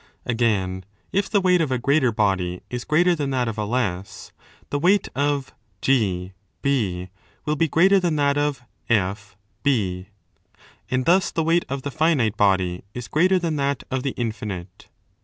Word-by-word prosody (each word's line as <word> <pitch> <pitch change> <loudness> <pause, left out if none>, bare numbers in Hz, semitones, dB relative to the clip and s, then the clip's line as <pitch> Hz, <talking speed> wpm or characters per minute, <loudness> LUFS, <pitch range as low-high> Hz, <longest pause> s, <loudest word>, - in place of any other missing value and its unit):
Again, 105 -6 0 0.3
if 200 +1 0
the 205 - +3
weight 180 -2 +3
of 150 -5 -1
a 130 - +1
greater 140 +1 +2
body 95 -4 0
is 125 -1 -4
greater 175 +4 +3
than 145 -4 -2
that 130 -3 0
of 110 -1 -4
a 105 - -1
less, 100 -5 -3 0.4
the 145 - 0
weight 190 +6 +3
of 140 0 -1 0.3
GA 95 -8 +1 1.1
will 150 0 0
be 165 +2 +2
greater 190 +6 +4
than 175 -4 0
that 140 -1 +2
of 145 -3 -1 0.3
1.83} 100 -1 -1 0.8
and 130 0 0
thus 180 +2 +4
the 160 - -1
weight 165 +2 +2
of 135 0 -4
the 145 - -4
finite 150 -8 +2
body 95 -3 +1
is 125 -1 -5
greater 185 +5 +3
than 165 -4 -1
that 140 0 -1
of 130 0 -1
the 135 0 -3
infinite. 100 -6 -5
130 Hz, 160 wpm, -23 LUFS, 105-155 Hz, 1.1 s, greater